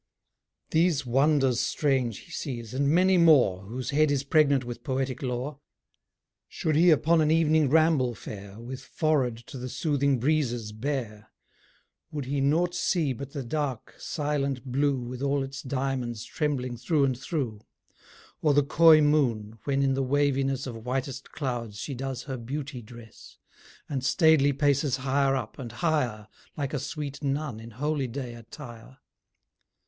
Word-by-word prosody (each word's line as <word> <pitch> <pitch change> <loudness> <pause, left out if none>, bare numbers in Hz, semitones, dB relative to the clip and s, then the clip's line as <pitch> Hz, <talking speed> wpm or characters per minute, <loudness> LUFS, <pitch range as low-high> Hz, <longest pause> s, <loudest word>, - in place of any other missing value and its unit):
These 160 -4 +2
wonders 135 0 +3
strange 130 -7 0
be 170 - -17
sees, 120 -7 -5
and 140 +2 +1
many 180 +3 +4
more, 145 - +5
Whose 120 +5 -5
head 155 +1 +3
is 140 -2 +1
pregnant 140 -2 +3
with 120 -1 -7
poetic 130 -1 -2
lore. 130 +2 -3 0.9
Should 155 -2 -1
he 170 +3 +6
upon 160 +1 +4
an 155 - +2
evening 160 -2 +3
ramble 155 -5 +3
fare 100 0 -9
With 125 +3 -7
forehead 135 -4 0
to 130 - -8
the 125 +1 -5
soothing 140 -1 +1
breezes 120 -6 0
bare, 110 -3 -4 0.8
Would 145 -3 -4
he 140 +1 -1
naught 165 +6 +2
see 160 -8 +1
but 140 +2 -8
the 140 -3 -4
dark, 135 -2 -3
silent 140 -4 -2
blue 135 +1 +1
With 125 +1 -6
all 140 0 +1
its 135 0 -6
diamonds 130 -4 -2
trembling 130 -5 -2
through 140 +5 +1
and 130 -2 0
through: 130 - -3 0.8
Or 150 -3 +3
the 145 - +5
coy 155 +2 +6
moon, 120 -8 +1
when 140 -1 +1
in 135 -1 +2
the 135 - 0
waviness 135 0 +1
Of 115 -4 -7
whitest 130 +1 -4
clouds 120 -7 -4
she 140 +6 -5
does 130 -1 -4
her 130 -2 -5
beauty 135 +2 -5
dress, 115 0 -14 0.5
And 135 -3 -3
staidly 155 -1 +4
paces 140 -1 +1
higher 135 +1 +1
up, 125 -2 -5
and 120 -4 -6
higher, 120 -8 -1 0.3
Like 140 -1 -3
a 145 - 0
sweet 145 +1 -5
nun 140 -4 -2
in 115 +1 -10
holy 140 +3 -2
day 125 0 -5
attire? 120 +1 -11
135 Hz, 155 wpm, -27 LUFS, 125-150 Hz, 0.9 s, he